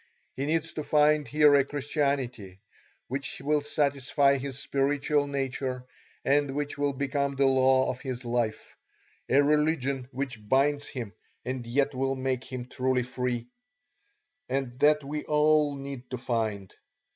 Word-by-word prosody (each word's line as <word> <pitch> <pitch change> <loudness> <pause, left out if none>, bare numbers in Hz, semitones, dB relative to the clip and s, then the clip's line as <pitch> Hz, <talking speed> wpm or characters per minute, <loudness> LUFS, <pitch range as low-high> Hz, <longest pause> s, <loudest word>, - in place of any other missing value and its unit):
He 135 +2 -2
needs 165 +1 0
to 155 - -4
find 150 0 +3
here 150 -1 +5
a 140 -1 +6
Christianity 140 - -2 0.5
which 140 +1 -4
will 150 +2 +1
satisfy 140 -1 +2
his 135 -1 -5
spiritual 145 +1 0
nature 130 -2 -3 0.4
and 140 0 +2
which 145 0 -2
will 145 0 0
become 140 +1 -1
the 135 0 +3
law 130 0 +4
of 130 0 -3
his 130 -2 -5
life, 120 -2 -2 0.5
a 140 +2 +5
religion 145 -3 +1
which 125 -6 -5
binds 145 +2 +2
him 115 -6 -6 0.3
and 130 -2 -4
yet 140 +4 +1
will 135 +1 0
make 130 -1 -2
him 130 -1 -6
truly 125 0 0
free; 125 -1 -3 1.0
and 130 -2 -2
that 150 0 +4
we 150 +2 -4
all 150 -1 +3
need 135 -2 -8
to 125 - -4
find. 110 -6 -2
135 Hz, 145 wpm, -28 LUFS, 130-145 Hz, 1.0 s, a